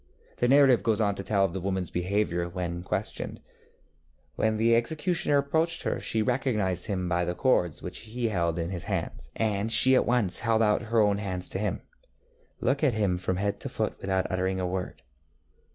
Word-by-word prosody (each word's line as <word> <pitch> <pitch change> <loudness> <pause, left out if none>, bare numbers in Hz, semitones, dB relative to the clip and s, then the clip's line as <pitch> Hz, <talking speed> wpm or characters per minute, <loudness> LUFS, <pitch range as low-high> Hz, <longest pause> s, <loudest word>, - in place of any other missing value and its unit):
The 120 - +1
narrative 135 -2 +5
goes 110 -3 +1
on 105 -2 +2
to 100 - -6
tell 100 -1 +2
of 90 - -3
the 95 - -4
womanŌĆÖs 95 -2 -2
behaviour 90 -1 0
when 85 -1 -4
questioned. 90 - -4 1.0
ŌĆśWhen 110 0 +2
the 115 +1 +4
executioner 155 +5 0
approached 160 +4 0
her - - -1
she 110 -1 -1
recognized 105 -8 0
him 95 -3 -2
by 90 0 +1
the 90 0 -2
cords 90 - +1
which - - -5
he 115 +1 -3
held 85 -4 0
in 85 +1 -2
his 90 -3 -5
hands, 60 +1 -4
and 105 0 0
she 130 +3 +6
at 130 - +3
once 120 -7 +2
held 115 -1 +2
out 105 -1 +2
her 115 0 +3
own 105 -1 +3
hands 95 -3 -4
to 95 - -3
him, 105 -2 -2 0.8
looking 140 +4 +2
at 125 - 0
him 100 -5 +1
from 95 0 -1
head 100 +2 -1
to - - -6
foot - - -2
without 95 -1 0
uttering 95 0 -1
a 90 - -1
word. 90 0 -4
100 Hz, 195 wpm, -27 LUFS, 90-115 Hz, 1.0 s, she